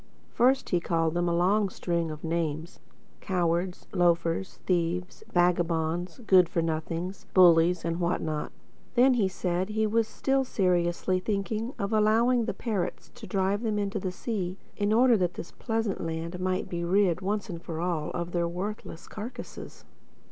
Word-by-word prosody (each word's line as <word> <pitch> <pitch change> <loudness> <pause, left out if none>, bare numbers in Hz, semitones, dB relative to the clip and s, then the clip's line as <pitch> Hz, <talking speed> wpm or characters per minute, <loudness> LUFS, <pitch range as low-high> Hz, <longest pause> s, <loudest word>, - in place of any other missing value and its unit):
First 260 +3 +3
he 175 - +2
called 165 -2 0
them 175 0 +1
a 170 - +1
long 195 +4 +2
string 170 -2 -2
of 155 -1 -7
names: 165 0 -2 0.4
cowards, 175 -1 -1
loafers, 170 +1 +1
thieves, 180 0 -1
vagabonds, 175 +1 +1
good 185 -4 +6
for 170 -1 0
nothings, 165 +3 -3
bullies 175 -1 +6
and 165 +1 -1
what 175 0 +1
not. 155 -1 -3 0.4
Then 255 +2 +6
he 220 -6 +2
said 185 0 -2
he 220 +1 0
was 225 +1 +1
still 270 +4 0
seriously 180 -4 +1
thinking 215 +5 -2
of 200 +2 -2
allowing 225 +3 +3
the - - -2
parrots 205 -7 -3
to - - -10
drive 195 +1 0
them 220 -3 -1
on - - 0
into 200 -1 -2
the 185 -1 -3
sea, 185 -2 -3 0.2
in 205 0 0
order 240 +2 +5
that 180 -2 0
this 170 - -7
pleasant 225 -4 -2
land 165 +2 -4
might 185 +1 -1
be 170 -1 -3
rid, 180 0 +2
once 205 +2 -2
for 165 -2 -5
all, 170 -3 -1
of 175 0 -4
their 170 -1 0
worthless 180 0 -6
carcases. 220 +4 -8
180 Hz, 160 wpm, -28 LUFS, 170-210 Hz, 0.4 s, good